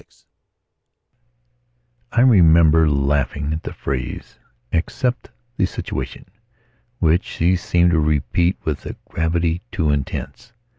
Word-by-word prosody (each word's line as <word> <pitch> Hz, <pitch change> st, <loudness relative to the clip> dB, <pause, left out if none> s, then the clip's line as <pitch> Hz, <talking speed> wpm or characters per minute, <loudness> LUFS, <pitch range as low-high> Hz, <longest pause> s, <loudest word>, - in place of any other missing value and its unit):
VI -, -, -28 dB, 2.0 s
I 120 Hz, -, +2 dB
REMEMBER 80 Hz, -8 st, +5 dB
laughing 70 Hz, +1 st, 0 dB
at 80 Hz, -, -4 dB
the -, -, -6 dB
phrase, 65 Hz, -2 st, -5 dB, 0.3 s
"accept 120 Hz, +8 st, -1 dB, 0.3 s
the 95 Hz, -, +2 dB
situation", -, -, -6 dB, 0.7 s
which 85 Hz, -1 st, +2 dB
she 90 Hz, +3 st, 0 dB
seemed 85 Hz, 0 st, +2 dB
to 80 Hz, -, +3 dB
repeat 80 Hz, +4 st, +1 dB
with 75 Hz, -3 st, -3 dB
a -, -, -6 dB
gravity 85 Hz, +1 st, -1 dB
too 80 Hz, -5 st, 0 dB
intense. 75 Hz, -, -4 dB
80 Hz, 110 wpm, -20 LUFS, 75-90 Hz, 2.0 s, REMEMBER